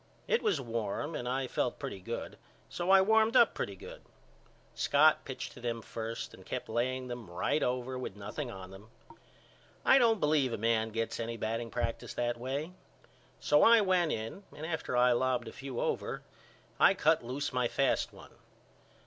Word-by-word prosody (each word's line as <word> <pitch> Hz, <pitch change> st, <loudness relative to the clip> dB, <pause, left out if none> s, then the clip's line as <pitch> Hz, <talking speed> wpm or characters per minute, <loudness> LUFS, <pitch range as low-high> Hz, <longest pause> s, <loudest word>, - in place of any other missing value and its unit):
It 470 Hz, -, +2 dB
was 175 Hz, -, +1 dB
warm 115 Hz, +4 st, -3 dB
and 125 Hz, -4 st, -3 dB
I 130 Hz, +1 st, -1 dB
felt -, -, -1 dB
pretty 95 Hz, -, -6 dB
good 115 Hz, +5 st, -6 dB, 0.3 s
so 175 Hz, +1 st, -3 dB
I 195 Hz, 0 st, +8 dB
warmed 220 Hz, +3 st, +3 dB
up 235 Hz, -, +6 dB
pretty 100 Hz, -, -4 dB
good. -, -, -11 dB, 0.7 s
Scott 150 Hz, +2 st, +4 dB
pitched 130 Hz, -, -6 dB
to -, -, -12 dB
them 115 Hz, -2 st, -3 dB
first 115 Hz, 0 st, -5 dB
and -, -, -13 dB
kept -, -, -5 dB
laying 130 Hz, +2 st, -1 dB
them 120 Hz, -5 st, -7 dB
right 90 Hz, -, 0 dB
over 125 Hz, +1 st, -1 dB
with 125 Hz, -, -5 dB
nothing 105 Hz, +7 st, -5 dB
on 95 Hz, -4 st, -9 dB
them. 100 Hz, +3 st, -13 dB, 1.0 s
I 270 Hz, -, +7 dB
don't 225 Hz, -3 st, +4 dB
believe 150 Hz, -6 st, +2 dB
a -, -, -1 dB
man 110 Hz, 0 st, +1 dB
gets 115 Hz, +1 st, -3 dB
any 115 Hz, 0 st, -3 dB
batting 115 Hz, +2 st, -3 dB
practice 120 Hz, 0 st, -3 dB
that 120 Hz, 0 st, -1 dB
way. 140 Hz, +7 st, -3 dB, 0.7 s
So 150 Hz, -, +4 dB
I 230 Hz, -1 st, +7 dB
went 185 Hz, -4 st, +2 dB
in 110 Hz, -, -4 dB, 0.2 s
and 155 Hz, -, -5 dB
after 160 Hz, -6 st, -2 dB
I 125 Hz, 0 st, +5 dB
lobbed 125 Hz, 0 st, +1 dB
a -, -, -6 dB
few 135 Hz, -3 st, -6 dB
over -, -, -2 dB, 0.6 s
I -, -, +6 dB
cut -, -, +3 dB
loose 135 Hz, +4 st, -3 dB
my 125 Hz, -1 st, +1 dB
fast 135 Hz, +3 st, +1 dB
one. -, -, -14 dB
125 Hz, 180 wpm, -31 LUFS, 115-150 Hz, 1.0 s, I